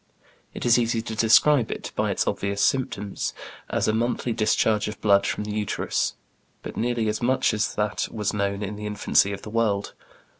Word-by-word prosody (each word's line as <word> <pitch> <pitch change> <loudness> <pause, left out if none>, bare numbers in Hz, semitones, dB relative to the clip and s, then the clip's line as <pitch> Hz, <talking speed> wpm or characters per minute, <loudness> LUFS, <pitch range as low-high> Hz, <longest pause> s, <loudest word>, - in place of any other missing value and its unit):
It - - -5
is 120 0 +5
easy 115 -1 0
to 110 -1 -5
describe 115 +4 +4
it, - - -5
by - - 0
its - - 0
obvious 100 0 -2
symptoms, 115 -7 -1 0.3
as - - 0
a 110 - +2
monthly 120 +1 -1
discharge 110 -1 +1
of 105 -1 -6
blood 100 -2 +3
from - - -2
the 105 - -5
uterus, 105 -1 -1 0.5
but - - -7
nearly 120 -2 0
as 105 0 -1
much 130 +2 +2
as 105 -1 -1
that 105 -2 -1
was 105 -3 -2
known 100 0 -1
in 105 +1 -5
the 105 0 -5
infancy 105 -1 +2
of 100 - -6
the 105 - -8
world. 105 -3 0
110 Hz, 190 wpm, -24 LUFS, 105-115 Hz, 0.5 s, is